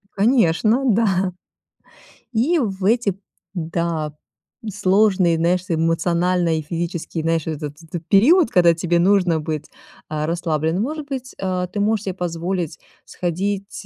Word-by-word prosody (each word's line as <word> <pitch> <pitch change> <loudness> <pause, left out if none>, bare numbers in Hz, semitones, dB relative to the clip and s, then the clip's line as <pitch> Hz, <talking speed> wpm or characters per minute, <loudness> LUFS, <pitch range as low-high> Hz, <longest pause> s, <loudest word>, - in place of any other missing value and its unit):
Конечно, 220 +2 +3
да. 195 -4 +2 1.0
И 280 +10 +2
в 195 -7 -2
эти, 210 -3 +2 0.4
да, 165 -3 -2 0.6
сложные, 190 -3 +3
знаешь, 175 +2 +2
эмоционально 170 +1 +1
и 155 - -2
физически, 170 +1 -4
знаешь, 165 -1 0
вот 160 -1 -2
этот 160 +3 -7
период, 260 - +5
когда 175 -2 +5
тебе 170 +1 0
нужно 180 -3 +3
быть, 155 -1 -4 0.4
а, 155 0 -2
расслабленным. 165 +1 -1
Может 300 +3 -4
быть, 260 -2 -6
а, 185 -1 -1
ты 195 +3 -5
можешь 210 +1 +1
себе 190 - -3
позволить 175 -2 -3 0.3
сходить, 195 +3 -3
180 Hz, 125 wpm, -21 LUFS, 165-205 Hz, 1.0 s, период